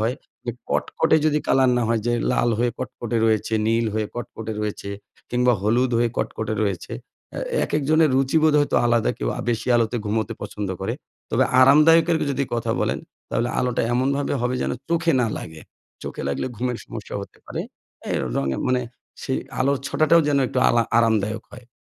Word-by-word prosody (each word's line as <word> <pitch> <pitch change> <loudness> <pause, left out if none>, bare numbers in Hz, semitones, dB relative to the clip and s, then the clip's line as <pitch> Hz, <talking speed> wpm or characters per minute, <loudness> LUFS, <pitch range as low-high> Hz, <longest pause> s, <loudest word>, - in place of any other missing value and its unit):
হয়, 115 +3 0 0.3
যে 120 - -1 0.2
কটকটে 160 -1 +2
যদি 150 -1 +2
কালার 130 -1 +4
না 120 - +1
হয় 115 -1 +1
যে 120 - +2 0.2
লাল 120 - +2
হয়ে 120 +1 +2
কটকটে 120 -1 -4
রয়েছে, 110 0 +1
নীল 115 +1 +2
হয়ে 110 -1 0
কটকটে 115 -2 -6
রয়েছে 105 -1 -4 0.4
কিংবা 125 0 +3
হলুদ 120 +5 +2
হয়ে 120 0 +3
কটকটে 110 0 -2
রয়েছে। 100 -4 -2 0.4
এ - - -3 0.3
একেকজনের 155 +1 +2
রুচিবোধ 155 +4 +3
হয়তো 145 - +1
আলাদা 120 -1 +2
কেউ - - -2
আ - - -2
বেশি 115 -1 -2
আলোতে 115 0 +1
ঘুমোতে 110 +2 -1
পছন্দ 105 -1 -4
করে। 95 - -2 0.4
তবে - - +3 0.2
আরামদায়ক 155 +5 +6
এর - - +3
যদি 140 0 0
কথা 115 - -1
বলেন, - - 0 0.3
তাহলে 120 +1 0
আলোটা 125 -1 0
এমনভাবে 140 +3 0
হবে 125 +1 0
যেন - - -1 0.2
চোখে 165 0 +2
না 120 - +2
লাগে। 80 -1 -9 0.4
চোখে - - -6
লাগলে 70 - -2
ঘুমের 125 +1 -2
সমস্যা 110 -3 -8
হতে 100 - -11
পারে। - - -4 0.5
এই - - +1 0.2
রঙের 70 -1 -1
মানে 125 0 +2 0.4
সেই - - -1 0.2
আলোর 140 +1 +2
ছটাটাও 155 +3 +4
যেন 145 -1 +3
একটু 125 - -2
আলা 120 0 +3 0.2
আরামদায়ক 110 -1 +1
হয়। 125 -1 -12
120 Hz, 175 wpm, -23 LUFS, 110-135 Hz, 0.5 s, আরামদায়ক